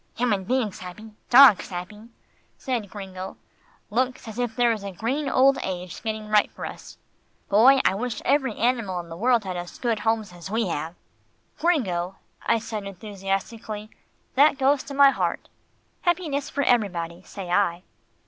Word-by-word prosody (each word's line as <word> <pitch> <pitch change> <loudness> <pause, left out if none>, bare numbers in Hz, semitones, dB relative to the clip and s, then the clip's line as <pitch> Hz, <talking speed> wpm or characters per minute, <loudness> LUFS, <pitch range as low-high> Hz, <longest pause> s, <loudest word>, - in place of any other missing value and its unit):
"Human 210 -6 +1
beings 245 -4 -1
happy, 200 +5 -9 0.2
dogs 250 -5 +8
happy," 210 +5 -8 0.5
said 240 -6 -3
Gringo, 190 -2 -8 0.5
"looks 255 +2 -1
as 220 +2 -7
if 240 -2 -2
there 240 -1 +3
was 215 -3 -3
a 200 - -5
green 260 - -2
old 270 +1 +4
age 180 -2 -5
getting 220 -1 -4
ripe 210 -1 +3
for - - -8
us. - - -9 0.5
Boy, 245 +7 +6
I - - +4
wish 230 +4 -3
every 270 -5 +2
animal 230 -6 0
in 170 -1 -8
the 165 - -7
world 235 +4 +2
had 185 -2 -4
as 175 0 -7
good 235 -4 -1
homes 220 -3 -1
as 175 +1 -9
we 220 -2 0
have." 160 +2 -4 0.6
"Gringo," 195 - 0 0.3
I - - +2
said 220 -2 -5
enthusiastically, 205 +2 -5 0.4
"that 280 +1 +5
goes 270 0 +3
to 280 - -7
my 280 0 +7
heart. - - -2 0.5
Happiness 325 -6 0
for 285 - -1
everybody, 180 -9 0
say 185 -1 -8
I." 180 -2 +1
215 Hz, 160 wpm, -25 LUFS, 190-250 Hz, 0.6 s, dogs